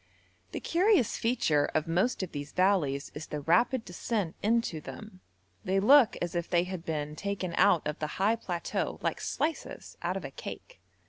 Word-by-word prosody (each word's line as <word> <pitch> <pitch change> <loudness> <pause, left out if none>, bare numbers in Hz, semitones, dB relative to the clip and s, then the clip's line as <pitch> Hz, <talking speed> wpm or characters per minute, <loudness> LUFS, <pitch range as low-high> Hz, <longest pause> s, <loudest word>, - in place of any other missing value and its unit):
The - - -4
curious 360 - +2
feature 160 -11 +2
of 155 +1 +1
most 190 +7 +1
of 185 - -5
these 145 0 -6
valleys 175 -8 +1
is 155 +1 -7
the 150 - -4
rapid 230 - +2
descent 180 -1 -2
into 220 -7 +1
them; 200 +2 -10 0.4
they 190 +1 +1
look 260 +4 +6
as 175 - -3
if 170 -1 -2
they 175 0 +3
had 180 -2 -6
been 150 -3 -3
taken 195 -1 -3
out 185 -4 +4
of 150 - -4
the 150 0 -4
high 205 +4 +3
plateau 175 -6 -3
like - - -1
slices 315 +1 -3
out - - -1
of - - -6
a - - -6
cake. - - -9
185 Hz, 180 wpm, -29 LUFS, 160-225 Hz, 0.4 s, look